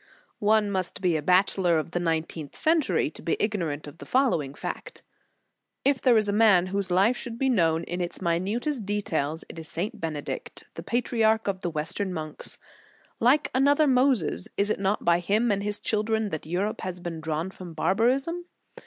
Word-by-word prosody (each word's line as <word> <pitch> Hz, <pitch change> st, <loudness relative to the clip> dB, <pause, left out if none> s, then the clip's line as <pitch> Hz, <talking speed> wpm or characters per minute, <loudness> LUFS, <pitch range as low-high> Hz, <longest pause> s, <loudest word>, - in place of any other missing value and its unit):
* -, -, -42 dB, 0.2 s
One 210 Hz, -2 st, +1 dB
must 185 Hz, -1 st, -1 dB
be 180 Hz, -4 st, +1 dB
a 155 Hz, -, 0 dB
Bachelor 180 Hz, 0 st, +3 dB
of 155 Hz, +1 st, -3 dB
the 175 Hz, -, -1 dB
nineteenth 160 Hz, -3 st, -2 dB
century 300 Hz, -, +2 dB
to -, -, -11 dB
be 165 Hz, -, -1 dB
ignorant 170 Hz, -9 st, -1 dB
of 150 Hz, +2 st, -11 dB
the -, -, -9 dB
following 170 Hz, -, +1 dB
fact. -, -, -6 dB, 0.8 s
If 275 Hz, -2 st, +3 dB
there 245 Hz, -3 st, +5 dB
is 215 Hz, -1 st, +2 dB
a 200 Hz, -, 0 dB
man 205 Hz, -5 st, +5 dB
whose 200 Hz, -1 st, -1 dB
life 195 Hz, +7 st, +3 dB
should 240 Hz, -2 st, -6 dB
be 265 Hz, +2 st, +1 dB
known 165 Hz, -8 st, +2 dB
in 175 Hz, +1 st, -4 dB
its 175 Hz, -, -4 dB
minutest 205 Hz, -, -1 dB
details, 160 Hz, -7 st, -2 dB
it -, -, -9 dB
is 160 Hz, -, -8 dB
St. 180 Hz, +7 st, -4 dB
Bene 155 Hz, -3 st, -3 dB
dict, -, -, -6 dB
the -, -, -7 dB
patriarch 225 Hz, -2 st, +1 dB
of 190 Hz, -2 st, -2 dB
the 175 Hz, -, -1 dB
Western 165 Hz, +5 st, -3 dB
monks. 155 Hz, -1 st, -4 dB, 0.6 s
Like 265 Hz, +6 st, +3 dB
another 285 Hz, +3 st, +4 dB
Moses, 255 Hz, -, +2 dB
is 205 Hz, +1 st, +2 dB
it -, -, -1 dB
not 195 Hz, +1 st, 0 dB
by 170 Hz, 0 st, +4 dB
him 210 Hz, +6 st, +1 dB
and 200 Hz, -1 st, 0 dB
his 205 Hz, 0 st, -3 dB
children 220 Hz, 0 st, 0 dB
that 155 Hz, -3 st, -5 dB
Europe 190 Hz, +6 st, -2 dB
has 180 Hz, -1 st, -5 dB
been 170 Hz, -2 st, -6 dB
drawn 160 Hz, +3 st, -2 dB
from 180 Hz, -4 st, -10 dB
barbarism 260 Hz, -, +1 dB
195 Hz, 190 wpm, -26 LUFS, 165-225 Hz, 0.8 s, there